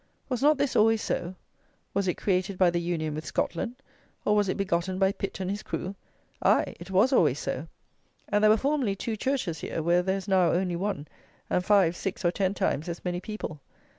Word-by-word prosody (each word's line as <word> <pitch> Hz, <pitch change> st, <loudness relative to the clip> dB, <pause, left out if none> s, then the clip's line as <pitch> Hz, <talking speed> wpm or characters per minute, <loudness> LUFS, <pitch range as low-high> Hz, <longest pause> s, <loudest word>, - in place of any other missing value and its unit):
Was 255 Hz, -2 st, -1 dB
not 295 Hz, +1 st, +5 dB
this 280 Hz, -1 st, 0 dB
always 225 Hz, +1 st, +5 dB
so? 180 Hz, +1 st, -2 dB, 0.6 s
Was 200 Hz, -1 st, 0 dB
it 180 Hz, -, +1 dB
created 185 Hz, 0 st, 0 dB
by 185 Hz, -2 st, +5 dB
the 170 Hz, 0 st, 0 dB
union 165 Hz, -3 st, -2 dB
with 155 Hz, +1 st, -4 dB
Scotland; 170 Hz, +9 st, -2 dB, 0.5 s
or 210 Hz, -, +3 dB
was 205 Hz, -2 st, +2 dB
it -, -, -1 dB
begotten 185 Hz, -1 st, 0 dB
by 190 Hz, 0 st, +3 dB
Pitt 195 Hz, -1 st, -5 dB
and 190 Hz, 0 st, -2 dB
his 205 Hz, +1 st, -3 dB
crew? 185 Hz, -, -4 dB, 0.5 s
Aye, -, -, +3 dB
it 175 Hz, -, -10 dB
was 200 Hz, +8 st, +3 dB
always -, -, +4 dB
so; -, -, -3 dB, 0.6 s
and 210 Hz, 0 st, +1 dB
there 215 Hz, -, +7 dB
were 215 Hz, -, +6 dB
formerly 270 Hz, -6 st, 0 dB
two 220 Hz, +3 st, -3 dB
churches 215 Hz, -, -1 dB
here, 160 Hz, -, -3 dB
where 175 Hz, +2 st, +3 dB
there 190 Hz, +2 st, 0 dB
is 195 Hz, -, -7 dB
now 185 Hz, -3 st, +4 dB
only 180 Hz, 0 st, 0 dB
one, 180 Hz, -5 st, -3 dB, 0.4 s
and 180 Hz, -, +2 dB
five, 185 Hz, -4 st, +4 dB
six, 190 Hz, 0 st, -4 dB
or 175 Hz, -, +4 dB
ten 190 Hz, +1 st, 0 dB
times 160 Hz, -1 st, -1 dB
as 170 Hz, +2 st, -6 dB
many 175 Hz, 0 st, -1 dB
people. 190 Hz, -8 st, -6 dB
190 Hz, 210 wpm, -28 LUFS, 175-210 Hz, 0.6 s, there